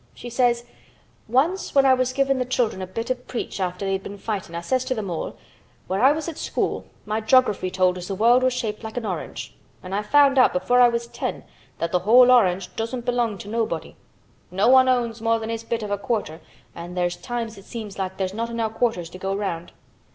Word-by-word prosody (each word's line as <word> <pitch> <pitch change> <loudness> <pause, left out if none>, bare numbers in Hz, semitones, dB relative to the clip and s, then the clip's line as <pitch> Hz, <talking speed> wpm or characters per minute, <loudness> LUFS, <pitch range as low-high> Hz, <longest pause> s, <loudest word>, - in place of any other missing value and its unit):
She 240 - -8
says, 240 -1 +2 0.6
'Once 290 - +1
when 275 -1 +6
I 265 - +6
was 255 0 +1
givin' 270 0 +1
th' 250 - -14
children 230 -6 0
a 185 - -4
bit 230 +7 -4
of 255 - -1
a - - -21
preach 240 -4 -5
after 180 +1 -2
they'd 195 0 -1
been 200 +1 -8
fightin' 195 -5 -4
I 170 - -3
ses 255 +8 0
to 255 -2 -2
'em 200 -4 -3
all, 165 - -4 0.5
"When 190 +2 -1
I 265 +3 +7
was 310 +2 -2
at 330 - -6
school - - -2 0.2
my 215 +1 -1
jography 220 -6 +3
told 185 -1 +2
as 180 - -7
th' 195 - -4
world 240 +4 +5
was 255 0 +3
shaped 225 -3 -3
like 220 +2 -7
a 230 -3 -2
orange 180 -5 -5 0.3
an' 185 +1 -7
I 205 - +1
found 275 +4 +4
out 255 - +5
before 245 +8 +3
I 245 - +7
was 235 0 -2
ten - - -5 0.3
that 170 - -2
th' 180 - +1
whole 245 +6 +7
orange 190 -6 +3
doesn't 235 +2 -4
belong 240 -4 0
to 200 - -10
nobody. 215 -7 -2 0.5
No 195 +6 +2
one 260 0 +6
owns 235 -3 0
more 230 0 +2
than 225 0 -5
his 230 0 -4
bit 230 -1 -3
of 205 - -5
a 205 - -1
quarter 205 - -3 0.3
an' 175 +1 -8
there's 175 -1 0
times 225 +2 -5
it 195 - -16
seems 215 -4 -7
like 190 0 -3
there's 190 -1 -2
not 230 +2 -3
enow 230 -1 -1
quarters 220 -6 -1
to 185 - -10
go 195 +1 -2
round. 175 -4 -4
225 Hz, 230 wpm, -23 LUFS, 190-245 Hz, 0.6 s, I